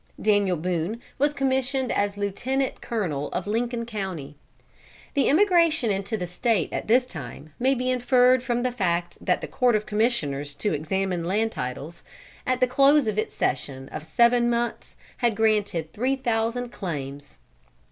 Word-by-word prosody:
Daniel 205 -4 +2
Boone 180 +6 -2 0.2
was 290 +2 +3
commissioned 265 -2 0
as 205 0 0
Lieutenant 245 +7 -2
Colonel 165 -11 -2
of 180 - -2
Lincoln 235 +2 -1
County. 190 -10 -5 0.8
The 280 - +2
emigration 335 - +4
into 200 +2 -2
the 180 - -3
State 180 - 0
at - - -3
this 250 +3 +4
time 145 - -9
may 265 +2 +3
be 255 0 0
inferred 250 0 +4
from 245 -1 -1
the 255 - +1
fact 175 -6 -2
that 180 - +1
the - - -4
Court 245 -3 +2
of 210 0 0
Commissioners 150 - -1
to 210 - -1
examine 180 +4 -1
land 215 +5 +1
titles, 140 - -6 0.5
at 255 0 +1
the - - +7
close 275 +3 +4
of 215 -1 0
its - - -3
session 135 0 -2
of 155 - -6
seven 240 +5 +3
months 235 0 -2 0.2
had 235 -3 +1
granted 205 -7 +1
three 255 +5 0
thousand 240 -1 -1
claims. 140 - -6
220 Hz, 155 wpm, -25 LUFS, 175-250 Hz, 0.8 s, the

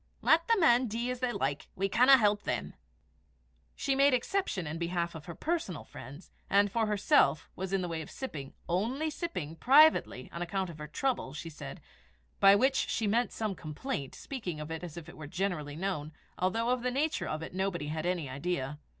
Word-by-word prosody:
Lat 320 +1 +6
the 460 -2 +4
men 250 -6 +5
dee 235 +3 -2
as 250 - -4
they 250 -1 0
like, 140 - -2
we 195 +1 0
canna 255 +6 +7
help 210 -3 +3
them." 70 - -3 1.0
She 275 - 0
made 275 0 +5
exception 250 - -1
in 160 +2 -4
behalf 170 0 -1
of 160 -2 -9
her 170 - -6
personal 195 - -2
friends; 140 - -11 0.2
and, 200 0 +4
for 225 +1 +1
herself, 210 - +3
was 190 +1 -4
in 195 -1 +1
the - - -2
way 165 -1 -3
of 155 - -9
sipping 145 - -7
only 245 - 0
sipping 180 - -4
privately, 275 - +5
on 170 - -6
account 185 0 -2
of 155 - -12
her 150 - -6
"trouble," 155 - -2
she 165 +2 -6
said 150 - -8 0.6
by 195 0 +8
which 265 +6 +2
she 225 - 0
meant 230 +4 +2
some 215 -3 -2
complaint, 155 - -5
speaking 195 - -5
of 150 +1 -6
it 160 +1 -5
as 175 -2 -7
if 170 -2 -8
it 175 - -12
were 155 -2 -7
generally 175 -4 -2
known, 160 -4 -3 0.2
although 225 +6 0
of 250 -1 +1
the 250 - 0
nature 290 +5 0
of 155 +1 -3
it - - -7
nobody 185 -5 -2
had 155 0 -3
an 180 0 +1
idea. 140 +1 -3
190 Hz, 200 wpm, -31 LUFS, 155-245 Hz, 1.0 s, by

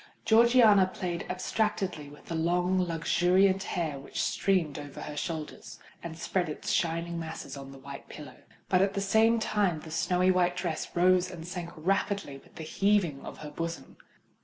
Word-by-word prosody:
Georgiana 225 -4 +6
played 175 -2 -4
abstractedly 185 -4 -2
with 145 - -15
the - - -6
long, 175 +3 +1
luxuriant 180 +3 +2
hair 160 -7 -3
which 135 - -7
streamed 170 -7 +1
over 145 -1 -9
her 150 - -6
shoulders, 155 0 -5 0.2
and 165 -1 -7
spread 175 0 -1
its 150 - -4
shining 170 0 0
masses 160 -2 -6
on 135 -1 -9
the 135 - -11
white 140 +1 -10
pillow; 145 -4 -10 0.3
but 185 -1 +3
at 195 0 +1
the - - 0
same 220 +4 +3
time 205 -7 0
the 160 - -10
snowy 180 +3 +2
night 180 -1 +1
dress 170 -4 -3
rose 185 +1 +4
and 170 -2 -8
sank 175 -1 -5
rapidly 180 -3 -1
with - - -23
the 160 - -7
heavings 180 -4 +1
of - - -8
her 150 - -7
bosom. 165 +2 -5
175 Hz, 170 wpm, -29 LUFS, 160-190 Hz, 0.3 s, Georgiana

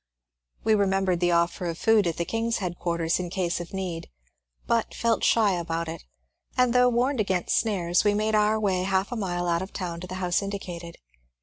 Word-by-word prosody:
We 220 - +3
remembered 195 -3 +2
the 175 0 +2
offer 170 +1 +1
of 165 -1 -3
food 220 -3 +3
at 165 - -2
the 170 - -1
King's 230 +2 -1
headquarters 170 -2 -1
in 180 -1 -3
case 175 -2 -1
of 175 -1 -7
need, 185 -4 -4 0.6
but 230 -1 0
felt 230 -1 +1
shy 220 -3 +4
about 170 -1 -2
it, 165 +1 -7 0.5
and 250 -1 +3
though 250 0 +5
warned 250 +2 +1
against 190 -4 +1
snares 180 -6 +1
we 205 0 +3
made 215 +1 0
our 215 +1 +3
way 190 -4 +1
half 190 +2 0
a - - -2
mile 175 -5 -2
out 170 0 +1
of 190 - -7
town 175 -3 -4
to 180 - -6
the 185 - -6
house 180 0 0
indicated. 180 -4 -6
190 Hz, 200 wpm, -26 LUFS, 175-215 Hz, 0.6 s, though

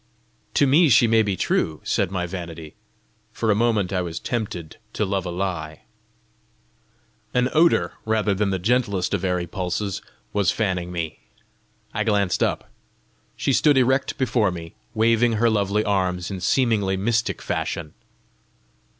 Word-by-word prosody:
"To 145 - +5
me 150 +4 +5
she 120 0 +6
may 115 -1 +4
be 100 -3 0
true!" 80 -3 0
said - - 0
my 90 -2 -2
vanity. 85 -3 -7 0.6
For 110 0 0
a - - +3
moment 105 -4 +1
I 90 - +1
was 85 -2 -4
tempted 100 -9 -4 0.2
to 105 - 0
love 95 -2 -2
a - - -3
lie. 85 -4 -4 1.5
An 125 0 +3
odour, 165 +2 +3
rather 110 -2 +1
than 100 +1 0
the 95 - 0
gentlest 100 -2 0
of 100 - -1
airy 90 -2 0
pulses, 95 +3 -3 0.3
was 100 -3 +2
fanning 90 -5 -1
me. 85 -3 -4 0.7
I - - 0
glanced 100 -4 +1
up. - - -1 0.6
She 135 - 0
stood 145 +1 +4
erect 130 +1 +2
before 115 -6 +2
me, 85 -2 -7 0.2
waving 115 +1 +3
her 115 +1 +2
lovely 105 0 +1
arms 95 -3 0
in 95 -2 -5
seemingly 105 -3 +2
mystic 115 +3 0
fashion. 80 -3 -3
100 Hz, 150 wpm, -23 LUFS, 90-115 Hz, 1.5 s, she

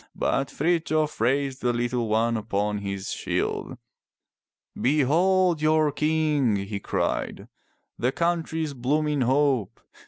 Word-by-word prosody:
But 135 0 0
Frithjof 155 -3 0
raised 135 +2 0
the 120 -1 +1
little 120 0 -1
one 115 +2 +1
upon 105 -1 -1
his 100 -1 -4
shield. - - -2 1.0
"Behold 165 +5 +2
your 155 -1 +3
King!" 150 -5 +1
he 100 +1 -3
cried, - - -2 0.5
"the 125 +2 +1
country's 160 -2 -1
blooming 145 +3 0
hope! 130 -4 +1
140 Hz, 105 wpm, -25 LUFS, 115-155 Hz, 1.0 s, your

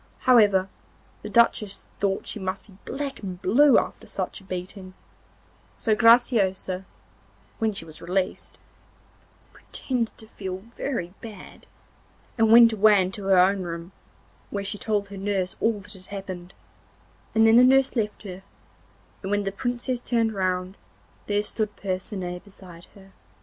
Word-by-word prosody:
However, 205 -7 +5 0.5
the - - -7
Duchess 225 -4 +2
thought 195 -1 0
she - - -2
must 190 0 -4
be 200 - -18
black 280 -1 -4
and 185 -3 -6
blue 285 +8 +5
after - - -2
such - - -4
a - - -17
beating; 185 0 -7 0.8
so 220 - +1
Graciosa, 210 -5 +3 0.7
when 220 -1 +1
she 195 -5 -5
was 155 -1 -11
released, 185 +2 -2 1.0
pretended 245 -4 -3
to 220 - -9
feel 190 -3 -7
very 190 -11 -3
bad, 215 -4 -11 0.7
and 225 -2 +3
went 230 0 +8
away 210 -1 +5
into 190 +2 -2
her 195 -1 +4
own 190 +2 +4
room, 170 0 -6 0.6
where 200 -1 -3
she 205 +1 -4
told 205 -2 -1
her 200 - -8
nurse 190 -2 -1
all 225 -2 +1
that 205 +2 -8
had 185 -2 -12
happened, 190 -3 -7 0.8
and 220 0 +5
then 225 +1 +6
the 250 - +8
nurse 265 +1 +4
left 215 -2 -2
her, 190 -2 -8 0.8
and 190 - -5
when 205 0 +1
the 195 - -2
Princess 245 +3 -2
turned 230 -3 0
round 185 -1 -2 0.5
there 205 0 +1
stood 215 -1 -3
Percinet 185 -2 -4
beside 180 -4 -14
her. 195 -1 -16
200 Hz, 150 wpm, -25 LUFS, 185-225 Hz, 1.0 s, went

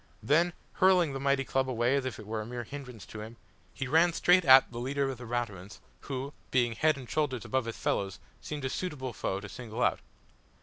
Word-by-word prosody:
Then, 170 +4 +3 0.2
hurling 180 -5 +4
the 135 - -3
mighty 140 0 +2
club 130 0 0
away 120 +2 +2
as 140 -2 0
if 130 -4 -4
it 110 - -10
were 110 +1 -3
a - - -6
mere 120 0 -5
hindrance 125 -4 -9
to 110 - -8
him, 110 +2 -9 0.3
he 140 - -4
ran 165 +5 +4
straight 180 +2 +4
at 130 -3 +7
the 120 - -6
leader 135 +3 -1
of 125 - -8
the 120 - -8
Raturans, 105 -5 -4 0.2
who, 135 +1 -5 0.2
being 120 -2 +2
head 155 +4 +2
and 130 -3 -9
shoulders 135 -6 -1
above 130 -2 0
his 115 - -5
fellows, 95 -2 -1 0.2
seemed 150 -3 -5
a - - 0
suitable 135 -9 -4
foe 95 -1 -2
to 100 - -8
single 120 +1 -5
out. - - +2
130 Hz, 220 wpm, -30 LUFS, 115-140 Hz, 0.3 s, at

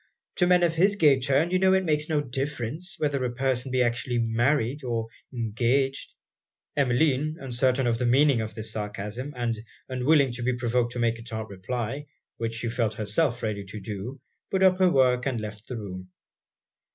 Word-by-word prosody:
To 180 - +3
men 180 -1 +5
of 170 -2 +3
his 195 +5 +3
gay 145 -8 +5
turn 140 +6 +1
you 185 - +3
know 190 0 +4
it 190 0 +1
makes 150 -1 0
no 150 -2 +2
difference, 140 - -4
whether 145 -4 0
a 125 - -1
person 130 0 0
be 130 -1 +3
actually 120 +1 -1
married 120 +4 +1
or 115 -3 -1 0.3
engaged.' 125 +4 0 0.6
Emmeline, 145 +3 +2
uncertain 130 0 +1
of 115 -1 +1
the 125 - +1
meaning 135 0 +4
of 110 0 -5
this 110 -1 -4
sarcasm, 105 +5 -4
and 120 -2 -1 0.3
unwilling 135 +1 +3
to 120 +1 -6
be 125 +1 +1
provoked 120 0 0
to 120 - -4
make 115 -1 +1
a - - -8
tart 110 -2 -6
reply, 120 +8 -4 0.3
which 115 0 -2
she 115 +1 -3
felt 115 -2 -1
herself 120 +5 0
ready 105 -2 -2
to 100 +3 -8
do, 105 +6 -6 0.3
put 190 -1 +1
up 185 0 +5
her 185 -1 +5
work 125 -4 +3
and 125 -4 -1
left 105 0 -7
the 125 - -5
room. 95 -3 -7
125 Hz, 190 wpm, -26 LUFS, 115-145 Hz, 0.6 s, men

